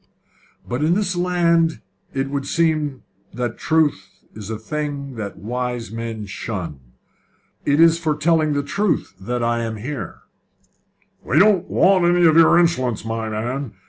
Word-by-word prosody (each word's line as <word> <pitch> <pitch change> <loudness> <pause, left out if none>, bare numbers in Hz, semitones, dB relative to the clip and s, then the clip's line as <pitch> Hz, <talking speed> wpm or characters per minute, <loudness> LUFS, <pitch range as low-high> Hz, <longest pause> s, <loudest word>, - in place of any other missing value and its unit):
"But 125 +4 -2
in 165 +3 +3
this 190 -3 0
land 170 -2 +2 0.3
it 135 0 -2
would 140 -1 -3
seem 155 -5 0 0.3
that 120 -2 -3
truth 160 -2 +1 0.2
is 105 -1 -9
a 110 - -3
thing 140 +3 -4
that 105 -4 -6
wise 125 +1 -4
men 115 -1 -5
shun. 95 - -5 0.9
It 145 +1 +2
is 165 0 +6
for 155 -3 0
telling 155 0 +2
the 145 0 0
truth 200 +7 -1
that 120 +5 -3
I 115 0 +1
am 115 -1 -3
here." 130 +7 -6 1.0
"We 135 - 0
don't 195 0 +4
want 185 -2 +4
any 175 0 +4
of 160 -1 +5
your 165 +1 +6
insolence, 130 -11 +1
my 115 0 -3
man! 120 +3 -3
140 Hz, 150 wpm, -21 LUFS, 115-165 Hz, 1.0 s, is